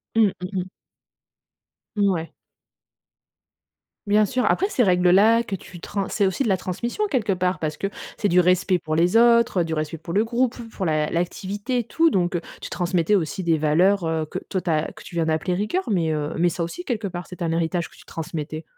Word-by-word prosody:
Mmh 215 -4 +5
mh 180 - -4
mh. 185 0 -3 1.3
Mouais. 190 -5 0 1.7
Bien 210 +1 +4
sûr. 250 +5 -1
Après 390 +3 +2
ces 255 - 0
règles 180 -2 +3
là 220 +5 +5
que 200 -4 -4
tu 175 -1 -11
trans 200 -1 -3
c'est 205 - +1
aussi 190 +8 0
de - - -1
la 190 -2 +2
transmission 235 - -3
quelque 220 -7 +1
part. 180 -2 -1
Parce 155 -1 -3
que 195 - -1 0.3
c'est 205 - +1
du 180 - +4
respect 180 +1 +3
pour 155 -1 -3
les 175 +6 +3
autres, 235 -4 +5
heu, - - 0
du 160 - -3
respect 155 +1 -3
pour 165 +2 -7
le 210 - +3
groupe, 240 +1 0 0.2
pour 190 - -4
l'a 155 -1 +1
l'activité, 200 +8 -2
tout. 330 +8 +2
Donc, 180 - 0
heu, 170 - -1 0.2
tu - - -6
transmettais 175 +2 +1
aussi 175 +1 -1
des 165 -2 +2
valeurs, 170 +5 +3
heu, 160 -1 -1
que - - -5
toi 185 - -1
tu 175 - -4
as. 155 0 0
Que - - -13
tu 170 - -11
viens 165 - +1
d'appeler 160 +3 0
rigueur. 210 - -1
Mais, 165 -4 +1
heu 150 0 -2
mais 175 +1 +3
ça 170 +1 -3
aussi, 355 - -6
quelque 220 -5 -2
part, 175 -1 -6
c'est 180 0 -11
un 165 -1 0
héritage 170 +1 -1
que - - -20
tu - - -17
transmettais. 155 -1 -5
180 Hz, 215 wpm, -23 LUFS, 165-205 Hz, 1.7 s, Mmh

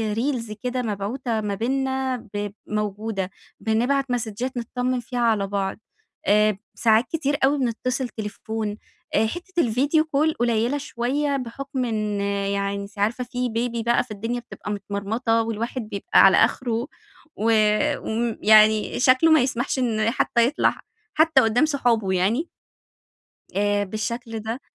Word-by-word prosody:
reels 230 -2 -2
كده 250 0 -1
مبعوتة 220 +2 -2
ما 205 -1 -2
بيننا، 265 +3 -1 0.2
ب 205 0 -2 0.2
موجودة، 210 -2 -3 0.3
بنبعت 250 +4 +1
مسدجات 240 +2 -3
نتطّمن 250 +2 -1
فيها 245 +1 -5
على 220 -4 +2
بعض، 195 -1 -2 0.5
آآ 210 0 +3 0.2
ساعات 225 +1 +3
كتير 290 -3 0
أوي 280 +2 +4
بنتصل 255 +1 -1
تليفون 215 0 -5 0.4
حتّة 350 - -1
الفيديو 280 +7 +2
كول 310 +1 +1
قليلة 235 +2 +1
شوية 280 +1 -1
بحُكم 260 +1 -4
إن 215 -3 -1
يعني 200 0 -1
أنتِ 200 +1 -12
عارفة 230 +5 0
في 250 0 -3
بيبي 230 0 -2
بقى، 235 +1 +2
فالدنيا 225 +1 -4
بتبقى 235 -3 -8
متمرمطة 210 +3 -1
والواحد 230 +3 -3
بيبقى 200 -2 +1
على 195 - +6
آخره 235 +1 +1 0.5
و 225 +2 +1 0.5
وم 230 0 -2
يعني 215 0 +5
شكله 260 +5 +5
ما 315 - +6
يسمحش 250 +1 -1
إن 225 -3 +1
حتى 235 -2 +2
يطلع 285 - 0 0.3
حتى 315 -3 +5
قدام 235 +5 +3
صحابه 240 -9 +1
يعني، 215 - +1 1.1
آآ 205 0 +2
بالشكل 225 +3 -4
ده، 225 +4 -5
230 Hz, 135 wpm, -23 LUFS, 215-255 Hz, 1.1 s, على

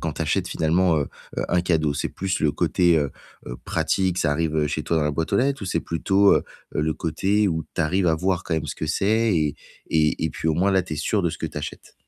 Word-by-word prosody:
quand - - -2
tu - - -2
achètes - - 0
finalement, 85 +1 +2
heu, 70 - 0 0.3
heu, - - 0
un 90 - +2
cadeau? 80 -4 +1
C'est 70 - -2
plus 95 -1 -2
le 75 -2 +2
côté, 85 -2 +2
heu 70 -3 -1 0.4
heu, - - -6
pratique 95 -2 0
ça 75 -4 +1
arrive 80 0 0
chez 80 +1 -3
toi 85 - 0
dans 80 - +2
la 75 - +1
boîte 80 +2 -3
aux - - +4
lettres 135 -2 +1
ou - - -3
c'est 85 -2 0
plutôt, 95 +4 +3
heu - - +1 0.3
heu, - - +2
le 80 0 0
côté 100 +5 +1
où 80 -2 -2
tu - - -1
arrives 90 +4 +1
à 80 - +4
voir 90 +2 -1
quand 85 - -1
même 80 -1 -2
ce - - -4
que 80 - -3
c'est 105 +6 +2
et 75 -3 0 0.3
et 80 -1 +2
et 80 - 0
puis 80 - -5
au 80 - +2
moins 95 +5 +2
là, 95 -1 +3
tu 90 - -7
es - - -2
sûr 100 +8 0
de 85 - +1
ce 80 - -7
que - - -3
tu 75 - -6
achètes? 75 - -8
80 Hz, 280 wpm, -23 LUFS, 75-95 Hz, 0.4 s, aux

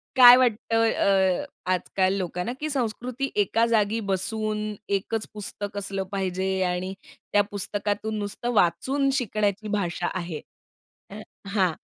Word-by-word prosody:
काय 245 -1 +10
वाटतं? 225 -2 +2
अ, 190 -2 +2 0.3
आजकाल 185 +1 +1
लोकांना 180 +5 -3
की 310 - -3
संस्कृती 255 0 -2
एका 225 +4 +1
जागी 220 -1 +2
बसून, 215 +3 0 0.3
एकच 205 +2 -1
पुस्तक 205 -1 -4
असलं 195 -1 -2
पाहिजे 190 -1 -1
आणि 180 +1 -2 0.4
त्या 205 - +6
पुस्तकातून 205 +2 -1
नुसतं 205 +4 -3
वाचून 270 +9 +2
शिकण्याची 215 -2 -1
भाषा 180 -4 -1
आहे. 170 -4 -4 0.7
अ 205 +2 -8 0.3
हां. 185 -5 +3
205 Hz, 120 wpm, -25 LUFS, 190-225 Hz, 0.7 s, काय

